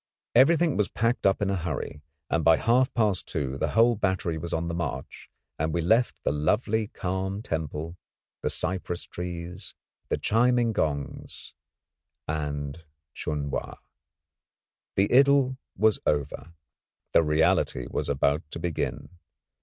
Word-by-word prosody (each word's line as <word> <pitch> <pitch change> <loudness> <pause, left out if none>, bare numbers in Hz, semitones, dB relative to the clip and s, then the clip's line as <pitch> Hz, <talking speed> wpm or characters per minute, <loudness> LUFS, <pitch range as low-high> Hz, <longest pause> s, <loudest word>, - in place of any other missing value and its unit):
Everything 165 +2 +5
was 105 -3 +1
packed 115 0 +1
up 95 +1 +2
in 100 - +1
a - - +1
hurry, 75 -4 -4 0.3
and 85 -1 0
by 80 0 +6
half 125 +3 +3
past 105 -6 +1
two 70 -4 -2
the - - -1
whole 115 +1 +6
battery 95 -4 0
was 85 +2 -5
on 80 0 -1
the 85 - -3
march, 85 -6 -5 0.3
and 80 +1 0
we 85 - +1
left 110 +8 +3
the - - +1
lovely 105 +9 +1
calm 95 +2 -3
temple, 80 0 -4 0.5
the - - 0
cypress 90 -1 -2
trees, 90 +2 -7 0.3
the - - +1
chiming 120 +1 +2
gongs, 70 -6 -3 0.7
and 75 0 -3 0.3
Chun 75 -2 -3
Wa. - - -3 1.2
The 100 +3 +2
idyll 135 -1 +5 0.2
was 110 +1 +3
over, 75 +3 -1 0.6
the - - +6
reality 75 -5 +2
was - - -2
about 70 +2 +2
to - - -6
begin. 85 -2 -3
90 Hz, 140 wpm, -27 LUFS, 80-110 Hz, 1.2 s, by